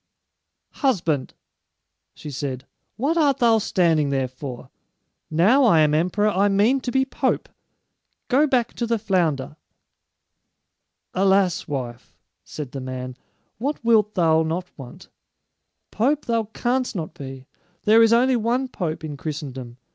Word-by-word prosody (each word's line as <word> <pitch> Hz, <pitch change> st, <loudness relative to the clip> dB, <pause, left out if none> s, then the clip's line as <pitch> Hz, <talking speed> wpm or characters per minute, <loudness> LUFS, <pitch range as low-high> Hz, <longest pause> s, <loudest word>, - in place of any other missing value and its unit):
"Husband," 165 Hz, -, 0 dB, 0.8 s
she 150 Hz, -, -8 dB
said, 130 Hz, -1 st, -5 dB, 0.3 s
"what 290 Hz, +8 st, 0 dB
art 285 Hz, -5 st, +3 dB
thou 230 Hz, -2 st, +4 dB
standing 165 Hz, -7 st, +1 dB
there 135 Hz, -2 st, 0 dB
for? 130 Hz, -1 st, -9 dB, 0.6 s
Now 195 Hz, -, +4 dB
I 170 Hz, -9 st, +5 dB
am 150 Hz, -1 st, +3 dB
emperor, 185 Hz, +7 st, +1 dB
I 200 Hz, 0 st, +2 dB
mean 215 Hz, +7 st, +2 dB
to 250 Hz, -, -3 dB
be 265 Hz, +1 st, +2 dB
pope! 265 Hz, -, -1 dB, 0.8 s
Go 285 Hz, +4 st, +3 dB
back 250 Hz, -4 st, 0 dB
to 235 Hz, -, -1 dB
the 230 Hz, 0 st, +1 dB
flounder." 170 Hz, -9 st, -1 dB, 1.6 s
"Alas, 190 Hz, -2 st, +2 dB
wife," 125 Hz, -4 st, -6 dB, 0.3 s
said 145 Hz, -5 st, -7 dB
the 135 Hz, -, -6 dB
man, 130 Hz, -1 st, -6 dB, 0.4 s
"what 275 Hz, 0 st, -3 dB
wilt 215 Hz, -2 st, +3 dB
thou 160 Hz, -3 st, +3 dB
not 170 Hz, +3 st, -3 dB
want? 130 Hz, -4 st, -12 dB, 0.8 s
Pope 275 Hz, +7 st, 0 dB
thou 230 Hz, -2 st, 0 dB
canst 245 Hz, +3 st, -2 dB
not 165 Hz, -4 st, -4 dB
be. 135 Hz, -4 st, -9 dB, 0.4 s
There 220 Hz, +2 st, +5 dB
is 225 Hz, 0 st, +5 dB
only 250 Hz, +2 st, +4 dB
one 245 Hz, +3 st, 0 dB
pope 165 Hz, -9 st, -4 dB
in 150 Hz, -2 st, -5 dB
Christendom. 135 Hz, -5 st, -6 dB
185 Hz, 135 wpm, -23 LUFS, 145-235 Hz, 1.6 s, I